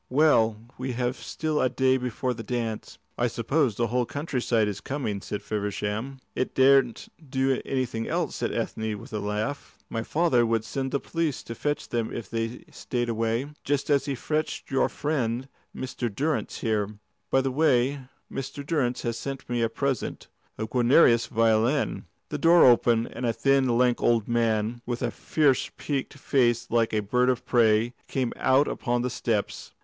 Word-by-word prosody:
"Well, 125 -6 +4 0.2
we 130 0 -3
have 125 +1 -1
still 155 0 -2
a 130 - +3
day 130 +1 +2
before 125 0 -2
the 115 - -7
dance." 115 -1 -4 0.2
"I 120 - +3
suppose 120 +2 0
the 120 - +1
whole 120 +1 0
country 145 -3 -3
side 115 -3 +2
is 105 -1 -4
coming," 125 -8 -3
said 105 - -5
Feversham. 105 +5 -3 0.2
"It 130 - -2
daren't 135 -3 +4 0.2
do 135 -1 +1
anything 125 -4 -2
else," - - -1
said - - -1
Ethne, 110 -1 -2
with 105 - -12
a 105 - -1
laugh. 105 +7 -3
"My 115 - -1
father 150 -2 +2
would 115 -1 0
send 135 +3 -3
the 140 - +1
police 165 -3 -2
to 115 - -6
fetch 145 +5 -2
them 115 -2 -1
if 115 - -6
they 115 +1 -3
stayed 120 -1 -3
away, 115 +4 -1
just 145 +1 0
as 140 -1 +3
he 140 -1 -2
fetched 155 +3 -3
your 135 - +2
friend 130 -4 -2 0.3
Mr. 125 -2 -3
Durrance 145 +8 -2
here. 105 -2 0 0.3
By 135 - +3
the 135 0 -1
way, 140 -1 +2 0.3
Mr. 135 +2 -5
Durrance 140 -6 0
has 115 -1 -2
sent 135 -1 -6
me 120 -1 -1
a 115 - +2
present 135 +1 -3 0.3
a 110 - -2
Guarnerius 120 +1 +4
violin." 115 +5 +1 0.2
The 150 - -3
door 170 +3 +6
opened, 120 -2 +4
and - - -6
a 115 - +1
thin, 135 -2 +2
lank 125 -1 +3
old 115 -3 +2
man, 115 0 0
with 120 -1 -2
a - - 0
fierce 145 -5 +1
peaked 140 -1 -3
face 120 -4 +1
like 115 -1 +2
a 110 - +1
bird 125 +5 +2
of 125 -1 0
prey, 115 0 +3
came 130 -3 -1
out 135 +3 +3
upon 120 -2 -1
the 125 - -1
steps. 110 -4 -2
125 Hz, 175 wpm, -26 LUFS, 115-135 Hz, 0.3 s, door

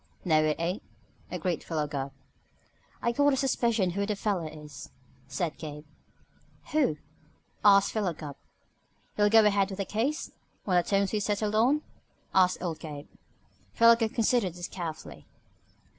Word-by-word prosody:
"No, 155 -3 +4
it 155 -1 +1
ain't," 175 +4 -1 0.5
agreed 180 -4 -2
Philo 155 -3 -2
Gubb. 140 -2 -4 0.9
"I 235 - +2
got 285 +3 +3
a - - +1
suspicion 235 -7 +1
who 200 +3 -2
the 210 - -1
feller 195 -5 -1
is," 150 -3 -10 0.4
said 170 -5 -3
Gabe. 150 -1 -7 0.9
"Who?" 285 - +2 0.7
asked 200 -1 +6
Philo 205 -5 0
Gubb. 150 -3 -8 0.8
"You'll 205 0 +3
go 220 0 +6
ahead 200 -1 +3
with 190 - -6
the 195 - -2
case? 245 - -2 0.3
On 190 - 0
the 175 - +6
terms 195 +2 +1
we 215 - 0
settled 205 +1 -1
on?" 260 +8 +3 0.5
asked 185 -1 +3
old 165 -3 -3
Gabe. 150 -2 -8 0.6
Philo 230 0 +7
Gubb 225 -2 -2
considered 225 -6 +1
this 175 0 -5
carefully. 165 -4 -7
195 Hz, 150 wpm, -28 LUFS, 165-220 Hz, 0.9 s, Philo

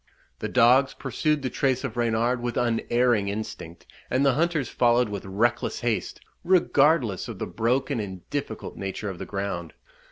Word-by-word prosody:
The - - -3
dogs 130 +3 +4
pursued 145 +3 -1
the 130 - -2
trace 130 -2 0
of - - -4
Reynard 120 +1 +1
with 120 -1 -3
unerring 120 -2 +1
instinct; 100 -5 -6 0.2
and 130 +2 +2
the 135 - +4
hunters 155 -2 0
followed 120 -1 +2
with 100 -2 -5
reckless 100 +5 0
haste, 120 -3 -2 0.2
regardless 150 - +3
of - - -7
the - - -3
broken 125 +4 0
and 95 -4 -6
difficult 145 -6 -4
nature 95 +1 -4
of 90 - -10
the - - -6
ground. 95 -5 -4
120 Hz, 160 wpm, -25 LUFS, 105-135 Hz, 0.2 s, dogs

